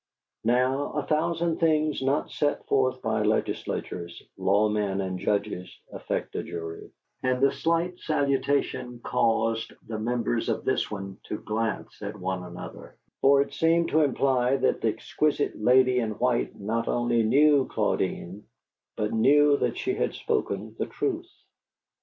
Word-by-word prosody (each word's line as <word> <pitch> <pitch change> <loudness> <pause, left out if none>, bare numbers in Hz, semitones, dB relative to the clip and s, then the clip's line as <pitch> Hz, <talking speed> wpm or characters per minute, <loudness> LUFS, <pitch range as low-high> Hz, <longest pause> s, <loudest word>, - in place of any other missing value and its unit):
Now, 130 +4 +1
a 150 - -1
thousand 165 +1 0
things 155 -3 +2
not 135 +2 0
set 145 -1 -1
forth 130 -1 +1
by - - 0
legislatures, 85 -1 -2 0.2
law 100 +3 +3
men 105 -2 -1
and 95 -1 -3
judges 100 -2 -1 0.2
affect - - -4
a - - -1
jury, 80 -1 -7 0.3
and 130 0 +1
the 140 +1 +4
slight 170 +5 -1
salutation 140 -4 0
caused 115 0 +1
the 110 -1 -4
members 115 - -1
of - - -2
this - - +1
one 95 -2 -6
to 105 - -4
glance 110 -1 -3
at 105 +1 -5
one 95 0 -2
another; 90 0 -10 0.2
for 140 0 +6
it 140 - -14
seemed 165 +3 +2
to 160 - +3
imply 130 -2 +2
that - - +1
the - - +1
exquisite 145 +6 0
lady 125 +3 +4
in 110 -3 -1
white 125 -1 0
not 110 +3 -2
only 120 -1 +1
knew 140 +4 +4
Claudine, 95 +5 -2 0.5
but 105 0 -1
knew 145 +6 +5
that - - -1
she 385 - -1
had - - -1
spoken 450 -2 -2
the - - -1
truth. 355 -3 -3
125 Hz, 145 wpm, -27 LUFS, 105-145 Hz, 0.5 s, for